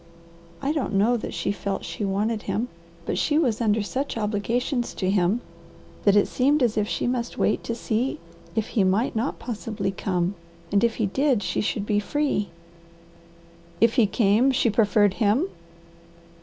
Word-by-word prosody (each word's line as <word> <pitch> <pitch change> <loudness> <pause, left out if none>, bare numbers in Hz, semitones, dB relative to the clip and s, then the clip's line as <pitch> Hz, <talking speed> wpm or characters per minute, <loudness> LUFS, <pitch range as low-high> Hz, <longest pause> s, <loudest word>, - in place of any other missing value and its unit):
I 275 - +1
don't 295 -8 -2
know 215 +5 +4
that 230 - -4
she - - -1
felt 200 -1 -3
she - - -5
wanted 210 +3 0
him, 235 +5 -2 0.4
but - - -1
she 295 - +2
was 245 -8 +1
under 215 -1 +2
such 260 +5 -3
obligations 230 +4 -1
to 185 -1 0
him 195 +4 +2 0.6
that 200 -1 +5
it 205 - +4
seemed 280 +2 +2
as 230 -3 +2
if 210 -1 +1
she - - -2
must 240 -1 -2
wait 210 - +1
to 230 - -2
see 245 +6 -1 0.4
if 220 - -1
he 210 - +2
might 200 +8 +1
not 230 +5 -1
possibly 215 -4 -3
come, 180 -1 -1 0.4
and 200 +1 +3
if 235 -1 +2
he 220 - 0
did 260 +1 +1
she - - -1
should 210 -1 -2
be 205 0 +1
free." 275 -2 -1 1.3
"If 230 0 +4
he 235 -5 +4
came, 215 +5 +3
she 250 -3 +2
preferred 205 -2 +3
him?" 225 - +3
220 Hz, 170 wpm, -25 LUFS, 205-245 Hz, 1.3 s, that